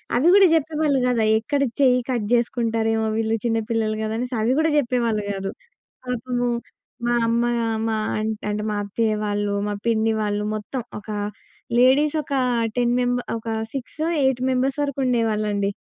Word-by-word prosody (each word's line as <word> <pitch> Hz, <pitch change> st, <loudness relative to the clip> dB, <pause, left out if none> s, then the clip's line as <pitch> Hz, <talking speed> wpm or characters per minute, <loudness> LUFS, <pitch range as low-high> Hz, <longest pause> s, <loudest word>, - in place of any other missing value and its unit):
అవి 260 Hz, +7 st, +3 dB
కూడా 395 Hz, -2 st, +7 dB
చెప్పేవాళ్ళు 305 Hz, -2 st, +1 dB
కాదు. 245 Hz, -2 st, +1 dB
అవిక్కడ 225 Hz, +7 st, +1 dB, 0.2 s
చెయ్యి 250 Hz, -2 st, +4 dB
కట్ 235 Hz, -4 st, 0 dB
చేసుకుంటారేమో, 225 Hz, -2 st, +1 dB
వీళ్ళు 225 Hz, 0 st, +1 dB
చిన్న 225 Hz, -1 st, +1 dB
పిల్లలు 220 Hz, -2 st, 0 dB
కదా! 220 Hz, -, -2 dB
అనేసి 250 Hz, +1 st, -3 dB
అవి 230 Hz, +3 st, +2 dB
కూడా 320 Hz, -, +3 dB
చెప్పేవాళ్ళు 235 Hz, -5 st, +1 dB
కాదు. 195 Hz, 0 st, -4 dB, 0.6 s
పాపము 245 Hz, 0 st, -1 dB, 0.6 s
మా 240 Hz, -, +2 dB
అమ్మ 235 Hz, +1 st, +1 dB, 0.4 s
మా 220 Hz, -, 0 dB, 0.5 s
అంటే 210 Hz, 0 st, -2 dB
మా 210 Hz, -, -1 dB
అత్తయ్య 215 Hz, +2 st, 0 dB
వాళ్ళు, 205 Hz, 0 st, -1 dB
మా 205 Hz, -, -1 dB
పిన్ని 225 Hz, -1 st, +2 dB
వాళ్ళు, 210 Hz, 0 st, -1 dB
మొత్తం 230 Hz, +4 st, -4 dB, 0.2 s
ఒక 210 Hz, -, -14 dB, 0.7 s
లేడీస్ 270 Hz, +5 st, +4 dB
ఒక 280 Hz, -, -9 dB, 0.4 s
10 240 Hz, 0 st, +2 dB
మెంబ 245 Hz, 0 st, +1 dB, 0.2 s
ఒక 225 Hz, 0 st, -7 dB, 0.2 s
సిక్సో, 280 Hz, +4 st, -4 dB, 0.2 s
ఎయిట్ 265 Hz, -2 st, +2 dB
మెంబర్స్ 260 Hz, +2 st, 0 dB
వరకుండేవాళ్ళండి. 225 Hz, -7 st, 0 dB
235 Hz, 150 wpm, -23 LUFS, 220-255 Hz, 0.7 s, కూడా